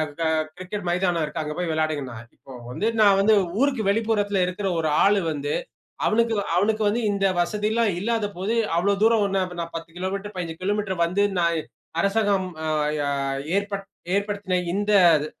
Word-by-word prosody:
ஆ - - +2 0.2
க - - 0 0.3
கிரிக்கெட் 185 +1 -6
மைதானம் 175 -2 +1
இருக்கு, 150 +1 -4
அங்க 150 0 -4
போயி 175 -2 -1
விளையாடுங்கன்னா 155 -6 -2 0.2
இப்ப 130 -2 -12
வந்து, 205 - -2 0.2
நான் 200 -2 +6
வந்து, 215 +2 +5 0.3
ஊருக்கு 270 -5 +1
வெளிப்புறத்தில 205 -3 +1
இருக்குற 190 +2 -2
ஒரு 155 - 0 0.2
ஆளு 200 0 +4
வந்து, 145 -1 -3 0.5
அவனுக்கு 230 +1 +2
வ 200 - +1
அவனுக்கு 215 +3 +2
வந்து 220 +4 0
இந்த 195 -1 +1
வசதில்லாம் 210 +5 +1
இல்லாத 225 +2 0
போது, 200 +5 -1 0.2
அவ்வுளோ 200 +4 +2
தூரம் 225 -1 +4
ஓண்ணு 195 -1 0
அப்ப 180 -1 -8
நான் 170 0 -6
10 165 0 -7
கிலோமீட்டரு, 195 +3 -4
15 165 -2 -5
கிலோமீட்டரு 200 -1 -1
வந்து, 200 +4 +1
நான் 170 -1 +2
இ 155 - -2 0.4
அரசாங்கம் 200 -1 +1 0.2
அ, - - -1 0.3
யா 145 - 0 0.5
ஏற்பட் 200 -1 -2 0.3
ஏற்படுத்தின 200 -2 -1 0.2
இந்த 205 +1 -1 0.3
அது 150 0 -2
195 Hz, 175 wpm, -24 LUFS, 175-210 Hz, 0.5 s, நான்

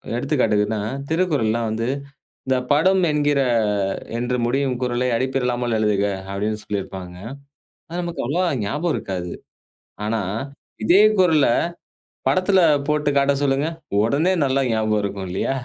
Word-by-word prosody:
எடுத்துக்காட்டுக்குன்னா 110 -6 +1 0.3
திருக்குறள்லா 150 -10 +1
வந்து, 115 +2 -2 0.6
இந்த 130 0 +2 0.2
படம் 185 +6 +4
என்கிற, 145 -1 +2 0.8
என்று 125 +1 -1
முடியும் 130 +1 0
குறளை 125 0 0
அடிப்பிறலாமல் 125 -2 0
எழுதுக. 105 -2 +1 0.3
அப்படீன்னு 105 +2 -2
சொல்லிருப்பாங்க. 95 -3 -5 0.7
அது 170 +2 -4
நமக்கு 170 -1 -4
அவ்வளவா 175 +8 +1 0.2
ஞாபகம் 150 +11 -1
இருக்காது. 90 -2 -4 0.8
ஆனா, 110 0 0 0.6
இதே 190 +4 +6 0.2
குறள 160 -6 +4 0.8
படத்துல 185 +1 +3 0.3
போட்டு 150 -1 +1
காட்ட 140 0 +3
சொல்லுங்க, 140 +2 +1 0.4
உடனே 145 +11 +2
நல்லா 135 0 +1
ஞாபகம் 110 -1 +1
இருக்கும், 100 -1 -4
இல்லையா? 95 +9 -1
130 Hz, 115 wpm, -22 LUFS, 110-150 Hz, 0.8 s, இதே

